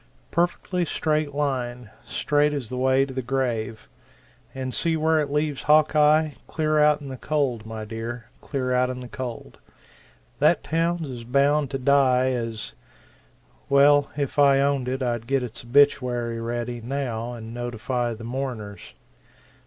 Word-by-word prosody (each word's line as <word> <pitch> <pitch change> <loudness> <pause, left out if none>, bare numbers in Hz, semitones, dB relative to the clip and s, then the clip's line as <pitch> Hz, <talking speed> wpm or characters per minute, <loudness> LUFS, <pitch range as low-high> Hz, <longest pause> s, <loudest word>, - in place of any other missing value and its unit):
Perfectly 175 +1 0
straight 155 -3 -1
line 125 -5 -2
straight 150 0 +1
as 135 -6 -3
the 125 - -4
way 130 +1 +3
to 135 - -8
the 130 - -2
grave. 120 -3 -2 0.7
And 130 -1 -4
see 165 -1 +1
where 160 0 +2
it 145 -2 -1
leaves 150 -1 -1
Hawkeye 155 0 +4 0.2
clear 155 -1 0
out 150 0 +4
in 140 - -8
the 130 - -6
cold, 130 -7 -1
my 110 -1 -6
dear, 115 +1 -6 0.2
clear 130 -3 -2
out 125 0 +2
in 125 0 -5
the 125 - -8
cold. 120 -1 -7 0.8
That - - +3
town's 165 0 0
as 125 -3 -7
bound 140 +3 +2
to 135 - -2
die 130 -1 +3
as 115 -3 -4 1.0
well 145 +1 +5
if 145 0 -2
I 140 -1 +6
owned 140 -2 +1
it 130 +1 -2
I'd 120 -2 -2
get 135 -1 +1
its 120 -1 -6
obituary 120 -3 +2
ready, 120 +1 -3
now, 120 -2 -3
and 115 -1 -8
notify 120 0 -2
the 115 - -11
mourners. 115 -5 -5
130 Hz, 155 wpm, -24 LUFS, 120-145 Hz, 1.0 s, I